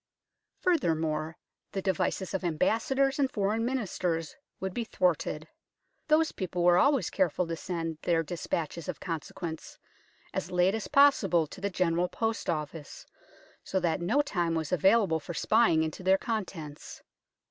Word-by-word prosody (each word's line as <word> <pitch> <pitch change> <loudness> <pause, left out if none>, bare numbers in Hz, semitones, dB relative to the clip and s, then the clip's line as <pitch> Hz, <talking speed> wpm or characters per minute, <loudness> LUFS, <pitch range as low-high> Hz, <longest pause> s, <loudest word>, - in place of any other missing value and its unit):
Furthermore, 160 - 0 0.4
the 195 - -2
devices 190 0 -1
of 190 - -2
Ambassadors 265 - +1
and 270 -2 +3
Foreign 215 0 0
Ministers 185 -10 -2 0.2
would 190 -1 -3
be 235 - -2
thwarted. 165 -6 0 0.6
Those 315 +1 +3
people 180 -2 -3
were 175 0 +6
always 280 +1 +3
careful 180 -2 +1
to 165 0 -3
send 165 -2 -4
their 165 -2 +1
de 160 - -7
spatches 170 0 -3
of 165 - -4
consequence 165 0 -6 0.6
as - - -3
late 180 +2 +3
as 225 - -3
possible 215 - +4
to 175 +5 -12
the 200 - 0
General 180 -1 +1
Post 225 +4 -2
Office, 150 -1 -4 0.6
so 190 - -1
that 175 -2 0
no 240 +12 +2
time 175 - -1
was 160 -2 -2
available 190 -1 +3
for 160 +3 -7
spying 215 -8 +3
into 160 +3 -4
their 190 +1 +4
contents. 185 -10 -5
180 Hz, 145 wpm, -29 LUFS, 165-215 Hz, 0.6 s, were